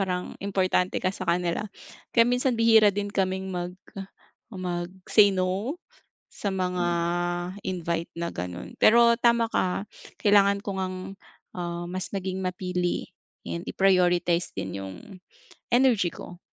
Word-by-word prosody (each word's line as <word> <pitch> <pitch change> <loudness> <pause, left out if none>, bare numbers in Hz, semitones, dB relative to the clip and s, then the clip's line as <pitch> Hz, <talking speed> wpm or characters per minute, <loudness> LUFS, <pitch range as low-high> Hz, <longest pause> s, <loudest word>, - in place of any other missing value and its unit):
parang 180 -2 -2
importante 190 -2 +1
ka 185 - 0
sa 185 -2 -7
kanila, 175 +4 0 0.5
kaya 230 - +7
minsan 250 0 +1
bihira 225 -2 +6
din 205 0 -2
kaming 190 -1 -1
mag 180 0 -4 0.7
mag 180 -4 -4 0.2
say 210 -2 +7
no, 190 - -1 0.5
sa 200 -2 -4
mga 180 -1 -1 0.8
invite 170 -2 -2
na 170 0 -3
ganon 90 - -7
pero 235 +1 +6
tama 235 -1 +3
ka 195 +1 -1 0.3
kailangan 200 -1 +4
ko 200 -2 -4
ngang 185 -1 -3 0.6
ah, 175 0 -4
mas 185 +2 -5
maging 190 -1 -3
mapili 180 -1 -2 0.4
and 85 0 -4
i-prioritize 180 -2 +2
din 95 +1 -4
yung, 95 -1 -7 0.8
energy 240 -7 +4
ko. 175 +1 -11
185 Hz, 125 wpm, -26 LUFS, 175-205 Hz, 0.8 s, kaya